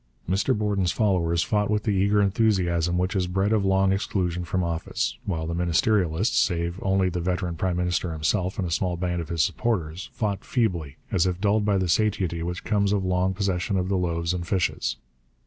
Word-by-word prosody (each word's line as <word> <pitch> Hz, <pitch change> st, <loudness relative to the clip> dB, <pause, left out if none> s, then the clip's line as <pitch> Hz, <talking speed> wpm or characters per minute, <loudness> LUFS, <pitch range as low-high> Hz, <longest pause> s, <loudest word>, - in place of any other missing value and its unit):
Mr 95 Hz, +4 st, +1 dB
Borden's 100 Hz, -4 st, 0 dB
followers 90 Hz, -6 st, +1 dB
fought 105 Hz, -1 st, 0 dB
with 105 Hz, -1 st, +1 dB
the 105 Hz, -, 0 dB
eager 100 Hz, +1 st, +3 dB
enthusiasm 90 Hz, -5 st, +1 dB
which 90 Hz, +2 st, -1 dB
is 90 Hz, -2 st, +1 dB
bred 95 Hz, +4 st, +1 dB
of 105 Hz, -3 st, +2 dB
long 95 Hz, 0 st, +3 dB
exclusion 90 Hz, -3 st, -1 dB
from 90 Hz, +1 st, -1 dB
office, 85 Hz, -1 st, -2 dB
while 80 Hz, -4 st, -2 dB
the 85 Hz, -, -3 dB
ministerialists 90 Hz, +2 st, +1 dB
save 85 Hz, 0 st, +1 dB
only 95 Hz, -1 st, +2 dB
the 90 Hz, -1 st, -2 dB
veteran 90 Hz, 0 st, -1 dB
prime 90 Hz, +1 st, -1 dB
minister 90 Hz, 0 st, 0 dB
himself 90 Hz, +4 st, -1 dB
and 95 Hz, -, -1 dB
a -, -, -5 dB
small 90 Hz, +1 st, 0 dB
band 90 Hz, -1 st, -1 dB
of 80 Hz, -, -8 dB
his 85 Hz, -3 st, +1 dB
supporters 90 Hz, -7 st, -2 dB
fought 100 Hz, -3 st, -2 dB
feebly, 90 Hz, -, -1 dB
as 95 Hz, -1 st, +2 dB
if 90 Hz, -1 st, -2 dB
dulled 105 Hz, +1 st, +2 dB
by 100 Hz, -2 st, +2 dB
the 95 Hz, -1 st, 0 dB
satiety 95 Hz, -3 st, +1 dB
which 90 Hz, +1 st, -4 dB
comes 100 Hz, -2 st, +1 dB
of 100 Hz, -2 st, 0 dB
long 95 Hz, +1 st, +1 dB
possession 95 Hz, -1 st, -1 dB
of 90 Hz, 0 st, -1 dB
the 100 Hz, -, +1 dB
loaves 85 Hz, -1 st, 0 dB
and 85 Hz, -1 st, -4 dB
fishes. 95 Hz, -4 st, 0 dB
90 Hz, 200 wpm, -25 LUFS, 85-100 Hz, -, eager